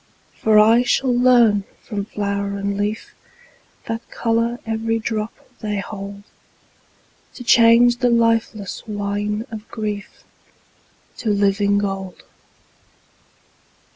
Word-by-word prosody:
For 215 -1 +2
I 225 +3 +6
shall 250 0 +1
learn 240 -5 +4 0.2
from 200 -2 -4
flower 200 -1 -3
and 200 0 -2
leaf 205 +2 -3 0.7
That 225 -3 -3
color 230 +1 0
every 225 0 -1
drop 220 -1 -3 0.3
they 210 -1 -3
hold, 200 0 -7 1.1
To 245 - -8
change 235 +1 +5
the 245 0 +2
lifeless 230 -4 0
wine 205 +1 -2
of 220 0 -8
grief 210 -3 -5 0.9
To 225 - -3
living 200 0 +2
gold. 195 -2 -4
215 Hz, 105 wpm, -20 LUFS, 200-230 Hz, 1.1 s, I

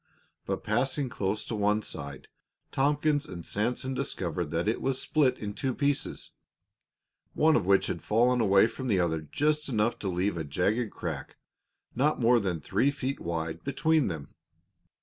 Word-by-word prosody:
But - - -2
passing 130 +5 0
close 105 -5 -2
to - - -5
one 105 +1 +1
side, 70 -3 -2 0.4
Tompkins 145 +1 +1
and 85 -3 -8
Sanson 125 +5 -1
discovered 90 - -3
that 85 +4 -1
it 110 - 0
was 135 -1 0
split 135 -5 +2
in 105 -1 -5
two 130 +3 -2
pieces, 145 -1 -1 1.0
one 155 0 +4
of 95 -6 +1
which 100 -1 +4
had - - -3
fallen 120 +3 +3
away 100 -2 +5
from 130 +3 -4
the 100 -6 +2
other 80 -3 0
just 150 - 0
enough 115 -1 +1
to 100 - -4
leave 90 +1 0
a 80 - -2
jagged 100 - 0
crack, - - -6 0.6
not 145 +5 +1
more 120 0 +5
than 95 -6 -2
three 130 - +1
feet 140 -1 -3
wide, 80 -1 -4
between 140 +2 +2
them. 80 -6 -6
110 Hz, 165 wpm, -28 LUFS, 90-135 Hz, 1.0 s, away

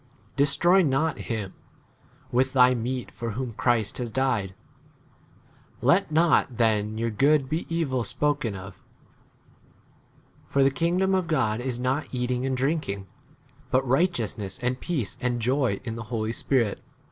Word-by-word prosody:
Destroy 150 +7 +4
not 155 0 +1
hvm° 105 -5 -4 0.8
with 130 +2 +1
thy 125 -1 +6
meat 125 +1 -3
for 115 -2 -5
whom 125 0 -4
Christ 115 -1 0
has 120 -2 -3
died. 115 -6 0 1.3
16 - - -2
Let - - +4
not 155 -6 +3
then 110 -2 +1
your 115 0 -1
good 140 +5 +3
be 155 +4 -3
evil 160 -6 0
l? - - -1
spoken 145 -6 -1
of; 95 0 -10 1.7
for 140 - +2
the 135 - +4
kingdom 175 +7 +1
of 185 -2 +1
God 110 -9 +1
is 125 -1 -3
not 130 +4 -1
eating 125 0 -1
and 130 -1 -1
drinking; 130 -8 -1 0.6
but 130 +1 +1
righteousness, 120 - 0
and 125 +1 0
peace, 140 - -3
and 125 -1 0
18 - - -3
joy 125 -3 +1
in 115 -2 -4
[the] 115 - -5
Holy 110 -2 -1
Spirit. 120 -5 0
125 Hz, 150 wpm, -26 LUFS, 115-145 Hz, 1.7 s, thy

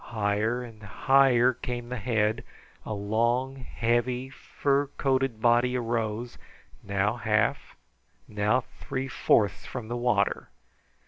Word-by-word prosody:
Higher 110 +3 0
and 115 -3 -12
higher 130 +4 +3
came 120 -1 -5
the 125 - -3
head, 110 -1 0 0.4
a 110 - -2
long, 120 +6 0
heavy, 125 +1 -1
furcoated 135 -3 -1
body 120 +2 +3
arose, 115 0 -3 0.4
now 100 +3 0
half, 105 -2 0 0.5
now 105 +4 +1
three 130 +1 -6
fourths 105 -5 +1
from 120 -4 -6
the 120 - -2
water. 120 -5 0
120 Hz, 110 wpm, -27 LUFS, 110-125 Hz, 0.5 s, higher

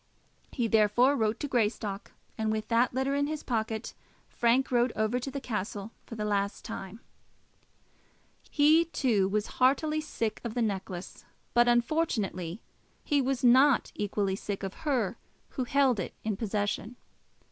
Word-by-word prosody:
He 240 -4 -1
therefore 225 +5 +4
wrote 220 -3 0
to 290 - -1
Greystock, 210 -5 -1 0.2
and 220 -1 -1
with 215 0 -3
that 235 +1 +3
letter 265 +2 0
in 285 0 +1
his 310 0 -4
pocket, 220 -2 -2 0.4
Frank 245 +3 +2
rode 240 0 +3
over 220 +3 0
to 255 - -5
the 280 - -4
castle 210 -3 -4 0.2
for 230 - -7
the 210 -1 -3
last 200 -1 -1
time. 220 -1 -7 1.5
He, 310 +3 +5
too, 235 - +1
was 210 +2 0 0.2
heartily 305 +4 +3
sick 225 -7 -3
of 235 -2 -5
the 245 - 0
necklace; 190 -3 -4 0.3
but 240 0 +5
unfortunately 235 - 0 0.4
he 285 -1 +2
was 265 -1 -1
not 260 +2 +5
equally 200 -1 -1
sick 200 0 -5
of 190 -1 -4 0.2
her 235 -5 0 0.3
who 255 - -3
held 265 -3 +2
it 180 - -5
in 215 -2 -1
possession. 210 +2 -2
230 Hz, 150 wpm, -29 LUFS, 210-260 Hz, 1.5 s, He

